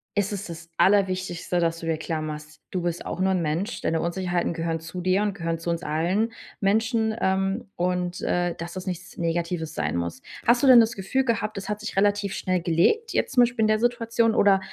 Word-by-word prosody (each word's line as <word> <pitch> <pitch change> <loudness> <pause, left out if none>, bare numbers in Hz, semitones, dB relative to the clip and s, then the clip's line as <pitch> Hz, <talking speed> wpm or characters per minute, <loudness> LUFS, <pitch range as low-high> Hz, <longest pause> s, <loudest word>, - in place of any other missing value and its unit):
ist 205 0 0
es 200 0 -4
das 165 -1 -9
Allerwichtigste, 185 -3 +2
dass 165 0 0
du 165 - -7
dir 165 - +1
klar 160 0 -3
machst, 150 0 -7
du 185 - -1
bist 175 -1 -2
auch - - -4
nur 190 0 +3
'n 185 - +1
Mensch, 165 +8 -2
deine 165 0 0
Unsicherheiten 175 0 -1
gehören 165 -1 -2
zu 165 +2 -7
dir 185 +2 +2
und 205 -1 0
gehören 165 -3 -2
zu 165 - -4
uns 170 +1 -1
allen 185 +9 0 0.3
Menschen, 220 +2 +1
ähm, 195 +4 0
und, 180 0 -1
äh, 175 -1 0
dass 170 +1 -6
es 185 +1 -6
nichts 180 0 -6
Negatives 170 -1 -2
sein - - -1
muss. 85 +8 -3 0.2
Hast 240 +2 +4
du - - +5
denn 250 -2 +10
das 225 +1 0
Gefühl 195 +8 0
gehabt, 215 -3 -1
es 195 - -5
hat 210 0 -2
sich 215 0 -6
relativ 205 0 +2
schnell 185 -2 -1
gelegt, 180 - +2
jetzt - - 0
zum 245 - +7
Beispiel 240 -2 +1
in - - +4
der 215 0 +3
Situation 230 -1 +1
oder 195 -1 +5
185 Hz, 220 wpm, -25 LUFS, 170-210 Hz, 0.3 s, denn